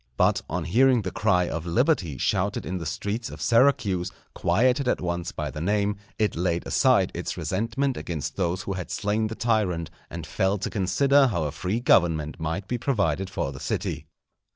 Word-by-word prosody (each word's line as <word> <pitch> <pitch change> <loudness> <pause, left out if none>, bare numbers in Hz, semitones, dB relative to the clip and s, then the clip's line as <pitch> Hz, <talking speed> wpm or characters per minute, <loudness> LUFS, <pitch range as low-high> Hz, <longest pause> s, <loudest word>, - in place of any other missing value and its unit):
But - - +3
on 85 +1 -2
hearing 120 +6 +3
the 95 - -3
cry 90 -4 +2
of 85 +1 -4
liberty 90 - +1
shouted - - 0
in 95 0 -3
the 80 - -4
streets 100 +7 -3
of - - -9
Syracuse, 115 -8 +2 0.2
quieted 130 +3 +2
at - - +2
once 85 -1 -3
by 75 -2 -4
the 75 +3 -6
name, 100 +3 +1 0.2
it 105 -1 +1
laid 85 0 -1
aside - - +3
its - - -4
resentment 115 +7 -1
against 80 -4 -4
those 90 0 -1
who 100 - -3
had 90 -1 -5
slain 110 +1 0
the 110 - -6
tyrant, 105 -9 0 0.2
and 85 -2 -6
fell 95 +5 0
to 95 - -4
consider 135 +8 +3
how 85 -9 -1
a 75 - -2
free 95 +8 -2
government 80 - +2
might 80 +5 -3
be 120 +2 -2
provided 95 - 0
for 85 -8 -2
the 65 - -9
city. - - -3
95 Hz, 185 wpm, -25 LUFS, 85-110 Hz, 0.2 s, But